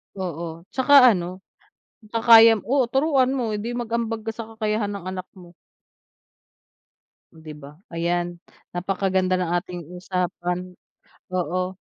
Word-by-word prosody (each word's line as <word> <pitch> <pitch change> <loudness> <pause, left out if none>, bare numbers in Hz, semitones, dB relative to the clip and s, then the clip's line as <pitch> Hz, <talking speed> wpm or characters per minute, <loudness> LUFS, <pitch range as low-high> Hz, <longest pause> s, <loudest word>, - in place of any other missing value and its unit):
Oo, 170 -3 -6
'tsaka 265 +2 +1 0.2
ano, 180 -1 -4 0.7
kakaya, 230 0 +7
oo, 260 0 +2
turuan 270 -2 +2
mo 225 -4 -2
hindi 230 +4 -4
mag-ambag 230 -2 -3
ka 225 - -2
sa 225 0 -7
kakayahan 215 -1 -1
ng 190 - -12
anak 185 0 -5
mo. 175 -1 -14 1.8
'Di 160 -1 -11
ba, 140 +1 -11 0.2
ayan 175 +1 -2 0.3
napakaganda 185 0 0
ng 180 -2 -1
ating 175 0 -6 0.2
usapan, 180 0 -3 0.6
oo. 185 +1 -1
185 Hz, 115 wpm, -23 LUFS, 175-225 Hz, 1.8 s, kakaya